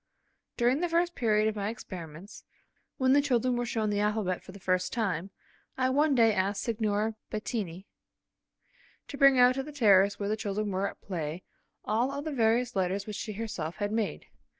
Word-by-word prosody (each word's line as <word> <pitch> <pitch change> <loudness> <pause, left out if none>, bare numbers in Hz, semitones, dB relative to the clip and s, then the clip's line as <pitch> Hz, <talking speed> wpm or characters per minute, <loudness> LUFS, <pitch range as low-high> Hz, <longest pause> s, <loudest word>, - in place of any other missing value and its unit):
During 245 +3 +2
the 350 +1 0
first 345 +1 +1
period 215 -5 +2
of 220 - -1
my 205 0 -2
experiments, 180 -4 -9 0.5
when 260 -2 +3
the 285 - +5
children 255 -3 +1
were 240 0 -2
shown 220 -2 -1
the 205 - 0
alphabet 210 -3 0
for - - -12
the 200 - -12
first 185 0 0
time, 195 -6 -1 0.5
I 260 0 +2
one 290 +1 +3
day 225 -3 +5
asked 195 +1 0
Signorina 220 -1 -1
Bettini 205 -5 -4 1.2
to - - -6
bring 275 -1 +6
out 250 0 +6
to 270 - -2
the 300 +3 -8
terrace 200 -7 +4
where 200 - -2
the 215 - +1
children 210 -1 -2
were 190 +1 0
at - - -14
play, 170 -2 -4 0.4
all 235 +5 +1
of 285 +2 -5
the 310 - -2
various 240 -1 +1
letters 190 +1 0
which 210 - -6
she 215 - -5
herself 195 -7 -4
had 205 0 -2
made. 220 -2 -2
215 Hz, 190 wpm, -29 LUFS, 200-250 Hz, 1.2 s, bring